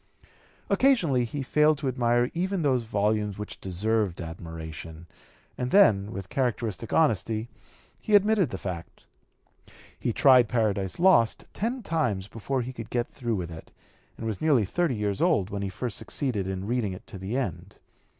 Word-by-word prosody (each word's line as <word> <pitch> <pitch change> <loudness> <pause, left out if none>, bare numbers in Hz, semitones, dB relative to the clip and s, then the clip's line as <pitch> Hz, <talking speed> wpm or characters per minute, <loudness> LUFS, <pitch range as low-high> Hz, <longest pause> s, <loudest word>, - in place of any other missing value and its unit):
Occasionally 170 - +3
he 135 +4 -4
failed 150 +3 +3
to 140 - -3
admire 120 -1 +1
even 185 +1 -1
those 130 -5 +1
volumes 105 -1 0
which 105 0 -7
deserved 100 0 -1
admiration, 80 -1 -8 0.5
and 125 0 -1
then 105 - +5
with 95 -2 -6
characteristic 115 -4 -2
honesty 115 - +1 0.5
he 210 - +2
admitted 205 - +4
the 95 - -5
fact. 90 -3 -7 0.9
He - - 0
tried 125 -2 +5
Paradise 100 -5 0
Lost 170 -11 +4
ten 235 +4 -2
times 125 - -1
before 125 +4 -3
he 130 +2 -6
could 115 -3 -8
get 120 -1 -1
through 120 -4 -2
with 90 -3 -4
it, 80 0 -10 0.5
and 115 - -6
was 110 -4 -3
nearly 140 -9 +3
thirty 165 - 0
years 105 -2 -2
old 150 - +2
when 100 0 -3
he 100 - -2
first 110 +3 -4
succeeded 115 -10 -2
in 95 0 -4
reading 115 -3 -1
it 90 - -10
to 95 - -10
the 100 +7 -3
end. 110 - -4
115 Hz, 160 wpm, -27 LUFS, 100-135 Hz, 0.9 s, then